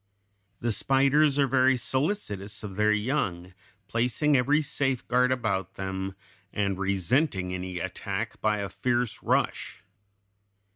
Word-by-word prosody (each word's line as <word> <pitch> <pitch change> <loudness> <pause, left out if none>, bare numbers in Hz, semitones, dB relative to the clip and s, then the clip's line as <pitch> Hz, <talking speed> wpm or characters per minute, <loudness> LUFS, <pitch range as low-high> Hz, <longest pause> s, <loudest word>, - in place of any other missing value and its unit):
The 120 - 0
spiders 135 +6 +3
are 140 - +4
very 130 0 +3
solicitous 120 - -2
of 100 -3 -6
their 105 +1 +3
young, 105 -6 -1 0.3
placing 125 +5 +1
every 145 +4 +3
safeguard 125 -3 +1
about 100 -7 -1
them, 95 0 -4 0.4
and 100 -2 -1
resenting 95 - +1
any 90 0 -4
attack 85 - -4
by 105 -1 +2
a 100 -1 -3
fierce 120 +4 -1
rush. - - -1
115 Hz, 115 wpm, -27 LUFS, 95-135 Hz, 0.4 s, are